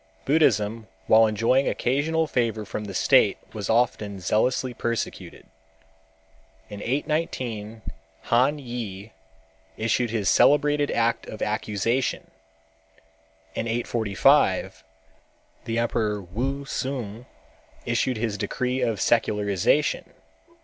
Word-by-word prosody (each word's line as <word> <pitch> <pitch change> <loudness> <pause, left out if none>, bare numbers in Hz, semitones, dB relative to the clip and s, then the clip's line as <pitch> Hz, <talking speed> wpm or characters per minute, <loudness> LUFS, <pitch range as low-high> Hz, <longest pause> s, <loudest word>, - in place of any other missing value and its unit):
Buddhism 115 -7 +2 0.2
while 110 +3 +6
enjoying 115 +5 +2
occasional 155 +6 0
favor 115 -7 -1
from 105 +1 -5
the 100 - -7
state - - +4 0.2
was 105 -2 -5
often 110 -4 +1
zealously 125 +7 0
persecuted. 115 -1 -4 1.3
In 105 0 -7
819 120 -6 -3 0.4
Han 130 +6 +2
Yü 115 -6 -6 0.7
issued 115 +2 0
his 105 -3 -1
celebrated 145 0 +4
act 115 0 0
of 110 - -5
accusation. 110 +4 -1 1.2
In 115 - -3
845 115 -3 +2 0.8
the 115 0 -2
emperor 110 -3 0
Wu 125 +10 -4
Tsung 125 -4 -4 0.6
issued 120 +1 0
his 110 -3 -2
decree 125 +3 -2
of 115 -5 0
secularization. 105 +5 +1
115 Hz, 95 wpm, -25 LUFS, 105-130 Hz, 1.3 s, while